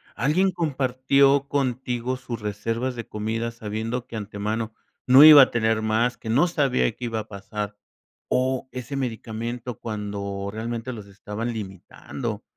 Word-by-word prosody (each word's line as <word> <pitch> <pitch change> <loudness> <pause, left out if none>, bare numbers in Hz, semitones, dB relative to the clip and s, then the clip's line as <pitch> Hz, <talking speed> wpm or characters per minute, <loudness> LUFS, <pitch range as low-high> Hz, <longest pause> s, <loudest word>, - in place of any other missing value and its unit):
¿Alguien 175 +9 +2
compartió 140 -3 +2
contigo 130 -2 -1
sus 120 -3 -6
reservas 115 +5 -2
de 115 - -6
comida 110 +2 -3
sabiendo 115 +2 -4
que 115 - -6
antemano 110 +2 -3 0.3
no 130 +3 +9
iba 155 -2 +11
a - - 0
tener 110 -1 +1
más, 115 +3 +1
que 110 - -11
no 140 +10 +4
sabía 140 -8 +1
qué 125 - -6
iba 115 -1 -2
a 110 - -7
pasar?, 105 0 -6 0.5
o 130 0 0
ese 130 +2 -5
medicamento 120 -1 -4
cuando 100 -2 -4
realmente 115 +3 -4
los 105 -4 -8
estaban 105 +4 -5
limitando 105 +2 -6
115 Hz, 145 wpm, -24 LUFS, 110-130 Hz, 0.5 s, iba